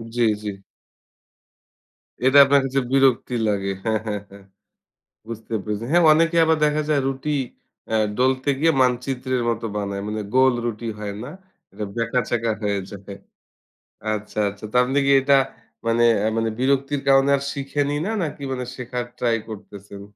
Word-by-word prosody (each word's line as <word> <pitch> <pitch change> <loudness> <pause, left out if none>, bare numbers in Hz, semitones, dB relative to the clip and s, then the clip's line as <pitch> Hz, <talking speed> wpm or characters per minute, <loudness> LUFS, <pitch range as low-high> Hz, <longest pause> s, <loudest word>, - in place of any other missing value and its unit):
জি, 120 - 0 0.2
জি। 100 -2 -6 1.6
এটা 135 +2 +5
আপনার 140 +1 +4
কাছে 135 +1 0
বিরক্তি 135 -2 +3
লাগে 100 -2 0
হ্যাঁ, 110 -1 +1
হ্যাঁ, 105 -2 -3
হ্যাঁ 100 0 -14 0.8
বুঝতে 115 0 -7
পেরেছি। 105 +1 -4
হ্যাঁ 175 +1 +5
অনেকে 165 +2 +2
আবার 160 0 +3
দেখা 150 0 +1
যায় 150 -2 +3
রুটি 135 +2 -3 0.6
আ - - +3 0.2
ডোলতে 130 +2 +1
গিয়ে 165 +2 +4
মানচিত্রের 125 0 0
মতো 115 0 -2
বানায়। 100 -1 -3
মানে 105 0 -3
গোল 130 0 +5
রুটি 115 0 -4
হয় 105 -1 -4
না 125 - -7 0.4
এটা 105 - -5
ব্যাকা-চ্যাকা 115 -1 0
হয়ে 100 -1 0
যায়। 100 0 -9 1.0
আচ্ছা, 105 0 -5
আচ্ছা 100 +2 -10
তো - - -11
আপনি 130 +3 -1
কি 140 - +3
এটা 140 +1 +4 0.5
মানে 115 +1 +3 0.2
এ্যা 110 - +1
মানে 115 0 +1
বিরক্তির 135 +2 +1
কারণে 135 0 +5
আর - - -6
শিখেনি 140 +1 -2
না? 215 - -1
নাকি 145 -2 -5
মানে 125 -1 -3
শেখার 125 -1 -4
ট্রাই 120 -2 +1
করতেছেন? 100 -1 -10
125 Hz, 155 wpm, -22 LUFS, 105-135 Hz, 1.6 s, এটা